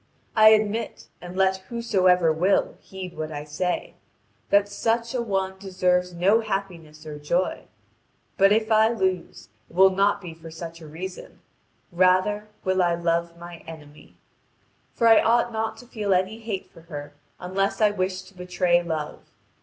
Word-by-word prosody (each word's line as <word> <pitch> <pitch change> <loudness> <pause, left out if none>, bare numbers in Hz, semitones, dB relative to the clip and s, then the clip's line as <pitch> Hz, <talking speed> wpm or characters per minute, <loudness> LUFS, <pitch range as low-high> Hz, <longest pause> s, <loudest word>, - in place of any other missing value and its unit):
I 215 -1 +8
admit 215 +1 0
(and 180 +1 -9
let 190 0 +3
whosoever 185 -8 +2
will, 180 +5 +1
heed 185 -2 -9
what 155 0 -5
I 145 -1 -5
say) 165 +4 -3 0.6
that 200 0 +4
such 230 +4 -1
an 235 -2 -2
one 190 -1 -2
deserves 180 -2 0
no 195 +6 +3
happiness 175 -7 -5
or 150 -1 -7
joy. 170 +5 -1 0.7
But 195 +1 +5
if 220 +1 +2
I 220 0 +5
lose, 185 - -2 0.2
it - - -18
will 190 +1 +6
not 200 +2 +2
be 175 -4 -9
for 165 0 -12
such 165 +1 -9
a 160 - -10
reason; 180 +5 -8 0.5
rather 185 +4 +2 0.2
will 185 0 +1
I 175 -1 +2
love 170 0 -1
my 170 0 -10
enemy. 150 -2 -13 0.8
For 230 - +1
I 225 -1 +7
ought 235 +1 +2
not 220 0 -2
to 245 - -13
feel 210 -5 -1
any 190 +5 -1
hate 220 -4 -5
for 165 - -16
her 145 -3 -8 0.3
unless 195 +2 -1
I 210 -2 +4
wish 185 -1 -2
to 190 - -17
betray 180 -1 +1
Love. 160 -3 -5
185 Hz, 160 wpm, -24 LUFS, 170-205 Hz, 0.8 s, I